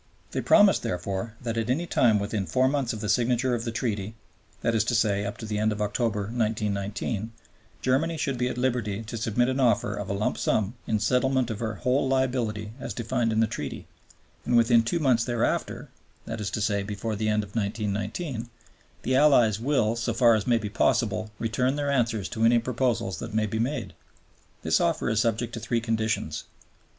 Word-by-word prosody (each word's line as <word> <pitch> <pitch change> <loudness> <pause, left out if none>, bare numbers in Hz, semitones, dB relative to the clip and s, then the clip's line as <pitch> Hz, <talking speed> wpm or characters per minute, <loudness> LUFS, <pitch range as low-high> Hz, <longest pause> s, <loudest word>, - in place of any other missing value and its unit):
They - - -2
promised, 205 -2 +5
therefore, 95 +5 -3
that 115 -1 -2
at 115 +1 -2
any 150 +7 +1
time 115 -9 +3
within 100 -1 -2
four 130 +10 +2
months 135 -3 0
of 110 - -5
the 105 - -3
signature 120 +4 +2
of 120 0 -2
the 115 - -2
Treaty 110 -3 -3 0.5
(that 115 - +1
is 110 -2 +3
to 120 - 0
say, 105 -3 +1
up 100 - -5
to 110 - -7
the 105 -1 -2
end 110 +1 +2
of 105 - -4
October, 105 +1 0
1919), 105 0 -2 0.5
Germany 155 +6 +1
should 140 -3 -1
be 125 - +1
at 125 - -4
liberty 120 -5 -1
to 115 +1 -7
submit 115 +2 +1
an 130 +1 -1
offer 120 -5 +2
of 105 -1 -5
a - - 0
lump 100 +2 -1
sum 105 0 +1
in 110 - +1
settlement 125 +3 +1
of 110 - -5
her 110 -2 -3
whole 130 +5 +1
liability 125 -5 0
as - - -5
defined 115 0 0
in 110 0 +2
the - - +5
Treaty, - - -5 0.6
and 120 0 +2
within 115 0 +5
two 115 +10 -1
months 130 -8 +3
thereafter 120 -1 -1 0.4
(that 115 -1 -5
is 100 - -2
to 110 - -3
say, 100 -1 +1
before 105 +2 -4
the 110 +1 -1
end 105 0 +1
of 100 +1 -12
1919) 110 - -3 0.5
the 130 - +1
Allies 125 -7 +5
"will, 115 -3 +1
so 115 0 -2
far 120 0 +5
as 110 +1 0
may 120 -1 +4
be 110 -2 -3
possible, 110 0 +1
return 125 +4 0
their 145 -1 -1
answers 115 -7 0
to 115 -1 -2
any 115 +1 +5
proposals 115 -4 -1
that 115 - -6
may 110 -1 +2
be 110 +1 -3
made." 120 - -2 0.7
This - - +2
offer - - +1
is 110 -1 +1
subject 115 0 0
to - - -4
three 115 +1 -1
conditions. 110 -8 -2
115 Hz, 200 wpm, -26 LUFS, 105-125 Hz, 0.7 s, promised